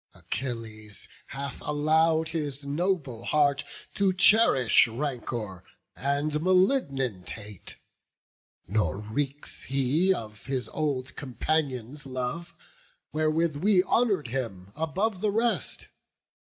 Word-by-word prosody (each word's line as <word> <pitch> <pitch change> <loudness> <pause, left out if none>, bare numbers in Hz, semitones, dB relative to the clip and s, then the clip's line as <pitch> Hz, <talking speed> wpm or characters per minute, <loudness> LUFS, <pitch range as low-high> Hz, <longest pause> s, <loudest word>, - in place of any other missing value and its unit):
Achilles 110 -5 -5 0.2
hath 140 0 -5
allow'd 160 +2 +2
his 145 -4 -3
noble 145 -6 -1
heart 145 -1 +3 0.3
To 200 -2 +3
cherish 180 - +5
rancour 115 -6 -4 0.3
and 145 +2 0
malignant 160 - +2
hate; 105 -3 -8 0.9
Nor 100 -4 +1
reeks 135 +7 -3
he 140 +7 +2
of 110 - -4
his 130 -2 -1
old 140 -3 -2
companions' 140 -1 -2
love, 130 +7 -4 0.6
Wherewith 155 0 +1
we 185 +3 +4
honour'd 200 - +2
him 105 -7 -4
above 185 +6 -1
the 215 - +2
rest. 220 - 0
140 Hz, 100 wpm, -28 LUFS, 125-165 Hz, 0.9 s, cherish